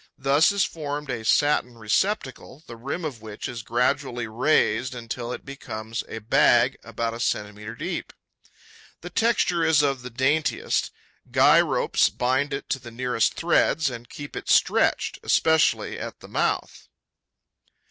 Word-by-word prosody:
Thus 140 +7 +4
is 200 -2 +2
formed 145 -3 -4
a 115 -3 -4
satin 125 0 +2
receptacle 130 - -2
the 115 - -10
rim 140 +9 -5
of 130 -8 -5
which 110 -2 -7
is 120 -1 -6
gradually 120 +1 -1
raised 125 0 +1
until 120 0 -5
it - - -7
becomes 115 -5 -6
a - - -6
bag 120 +3 +3
about 115 0 -3
a 115 - -7
centimetre 105 0 -3
deep. - - -4 0.9
The 175 - -8
texture 185 -5 +1
is 160 -2 +4
of 135 -3 0
the 125 - -7
daintiest. 135 +6 0 0.4
Guy - - +6
ropes - - +2
bind 130 +4 0
it 140 - -4
to 135 - 0
the 120 -2 -10
nearest 120 -1 0
threads 160 -3 +2
and 120 -1 -9
keep 145 0 -9
it - - -6
stretched, - - +2
especially 160 -1 +2
at - - -7
the - - -13
mouth. - - -2
125 Hz, 145 wpm, -24 LUFS, 115-145 Hz, 0.9 s, Guy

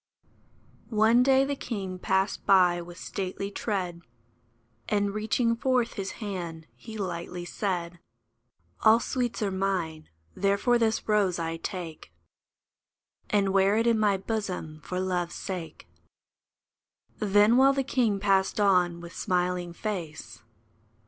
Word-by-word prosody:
One 225 +2 +4
day 265 +1 +4
the 285 +1 -2
king 195 -8 -5
passed 190 +2 0
by 180 -3 +5
with 175 0 -11
stately 195 +1 -4
tread, 185 -6 -3 0.9
And, 205 -1 +1
reaching 230 +2 +1
forth 250 -1 +1
his 195 -1 -4
hand, 175 -7 -6
he 220 -1 -9
lightly 175 -2 -4
said, 175 -3 -3 0.3
' 115 +2 -50
* 85 +1 -36
All 220 +1 +7
sweets 240 -2 -2
are 200 - 0
mine; 185 -5 -2 0.2
therefore 200 +5 +2
this 225 -1 0
rose 205 -4 +2
I 165 -1 -3
take, 165 - -6 1.2
And 200 -2 +2
wear 195 +2 +4
it 225 - +2
in 230 -2 +3
my 205 -2 +3
bosom 190 -7 -4
for 180 - -3
Love's 180 -2 -1
sake." 180 -4 -6 1.3
Then, 210 +2 +4
while 270 +1 +6
the 270 0 0
king 235 -6 +1
passed 195 0 +2
on 180 -4 +3
with 170 -1 -10
smiling 180 -2 -1
face. 170 -5 -6
195 Hz, 130 wpm, -27 LUFS, 175-215 Hz, 1.3 s, All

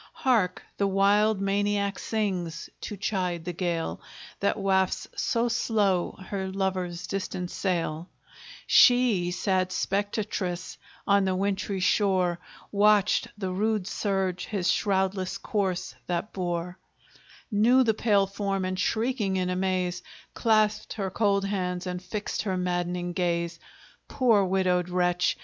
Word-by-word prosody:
Hark! 230 -9 +1
the 200 - +2
wild 200 +2 +3
maniac 200 0 0
sings, 185 -7 -3
to 210 - -6
chide 180 -4 -2
the 180 - -3
gale 170 -2 -2 0.4
That 200 - +1
wafts 190 -2 +1
so 235 +1 +1
slow 210 -6 +1 0.2
her 190 -2 -2
lover's 185 -2 -2
distant 180 -1 -4
sail; 170 -3 -2 0.6
She, 245 -8 +5
sad 185 0 0
spectatress, 200 -3 -2 0.3
on 200 -1 +4
the 190 -1 +1
wintry 195 0 -1
shore, 185 -2 +2 0.3
Watched 210 0 +3
the 190 -3 -3
rude 210 +1 0
surge 195 -3 -1
his 195 -4 0
shroudless 190 -2 0
corse 190 -4 -2
that 175 +4 -2
bore, 175 -1 -3 0.7
Knew 235 +5 +5
the 225 -2 +2
pale 205 -2 +3
form, 195 -1 -2
and 185 0 -3
shrieking 220 -2 0
in 180 0 0
amaze, 180 -1 -1 0.3
Clasped 215 -2 +2
her 195 -3 -3
cold 200 -1 +1
hands, 180 -2 -2
and 180 -1 -4
fixed 205 +3 -3
her 190 -3 -2
maddening 175 0 -2
gaze; 170 -2 -1 0.5
Poor 230 -6 +3
widowed 180 -1 +1
wretch! 180 0 +1
190 Hz, 125 wpm, -27 LUFS, 180-205 Hz, 0.7 s, She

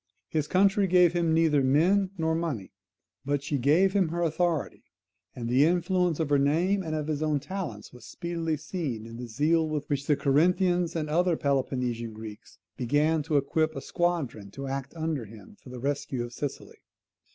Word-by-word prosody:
His 155 -2 -1
country 195 +2 +3
gave 180 -1 +5
him 170 -2 +1
neither 160 -3 +3
men 180 +9 +3
nor 160 -1 0
money, 160 - -3 0.5
but 140 0 -1
she 145 -1 -1
gave 165 +9 +3
him 195 -4 +3
her 170 +2 -2
authority; 165 -1 -1 0.5
and 120 -2 -5
the 125 +4 +4
influence 175 0 +1
of 160 -3 -1
her 145 - +4
name 170 +8 +2
and 160 -3 -3
of 155 -1 -2
his 155 -1 -2
own 155 -2 +1
talents 145 - -6
was 125 - -14
speedily 165 -2 -3
seen 150 - -4
in 115 0 -9
the 125 0 -6
zeal 155 +7 +1
with 150 -1 -3
which 140 -1 -2
the 150 - +4
Corinthians 175 +5 +2
and 155 -2 -1
other 170 +2 +2
Peloponnesian 125 -4 -1
Greeks 110 -1 -10 0.2
began 150 +5 +2
to 150 0 0
equip 155 +3 0
a - - -4
squadron 155 - -2
to 135 +7 -7
act 135 0 -4
under 160 -6 -2
him 105 -2 -14
for - - -13
the 125 - -8
rescue 140 -2 -2
of 120 0 -8
Sicily. 140 +3 -6
155 Hz, 185 wpm, -27 LUFS, 135-170 Hz, 0.5 s, gave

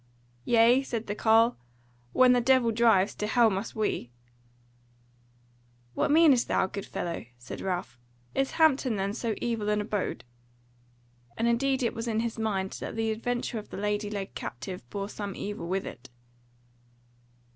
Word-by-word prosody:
"Yea?" 235 +2 +5
said 235 -4 -4
the 205 - -3
carle, 225 +2 +4 0.5
"when 255 - +6
the 245 - +3
Devil 255 -2 +4
drives, 215 -3 +3
to 210 - -3
hell 230 0 +4
must 195 +3 -4
we." 215 - -1 1.8
"What - - 0
meanest 295 -5 +5
thou, - - +2
good 200 +1 -6
fellow?" 170 -8 -4
said 120 - -8
Ralph, 180 -9 -3 0.3
"Is 270 0 0
Hampton 280 -7 +3
then 195 0 -1
so 225 -1 -2
evil 225 -3 -1
an 210 0 +2
abode?" 210 -1 -3 1.1
And 230 - +1
indeed 265 +3 +1
it 235 - 0
was 230 0 -5
in 225 -1 0
his 230 -1 -3
mind 195 -4 -1
that - - -6
the 225 0 0
adventure 240 +1 -2
of 210 - -11
the - - -7
lady 210 +1 -1
led 200 -2 -5
captive 185 -1 -7
bore 200 -1 -4
some 205 -2 -6
evil 205 -4 -5
with 190 +2 -1
it. 130 +2 -9
220 Hz, 155 wpm, -28 LUFS, 200-240 Hz, 1.8 s, when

